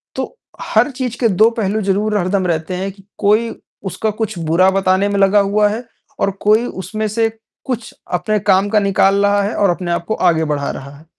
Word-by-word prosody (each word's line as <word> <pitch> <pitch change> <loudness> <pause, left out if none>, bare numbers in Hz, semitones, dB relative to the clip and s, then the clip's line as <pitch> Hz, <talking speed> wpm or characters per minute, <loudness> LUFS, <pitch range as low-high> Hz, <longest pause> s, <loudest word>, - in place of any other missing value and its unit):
तो, - - -5 0.2
हर - - +2
चीज़ 250 -2 -4
के 235 - +3
दो 225 - +8
पहलू 215 +1 0
ज़रूर 205 +2 0
हरदम 185 0 0
रहते 165 +1 -2
हैं 190 +2 -3
कि 195 0 -19
कोई 215 +3 +2 0.4
उसका 220 - -2
कुछ 215 -3 -2
बुरा 185 +4 +4
बताने 190 0 +2
में 200 0 0
लगा 195 +1 +5
हुआ 210 +1 +3
है 220 +4 -4 0.4
और 200 - +1
कोई 215 +3 +4 0.2
उसमें 215 +2 -3
से 225 +2 +1 0.4
कुछ 240 -3 -4 0.2
अपने 210 +5 -1
काम 195 +1 +4
का 215 0 +3
निकाल 200 0 +3
रहा 205 0 +3
है 205 - -2
और 200 - +2
अपने 175 0 -2
आप 170 0 -1
को 220 - -1 0.2
आगे 160 -1 +1
बढ़ा 145 -2 -2
रहा 135 +1 -8
है। 155 - -18
200 Hz, 210 wpm, -17 LUFS, 185-215 Hz, 0.4 s, दो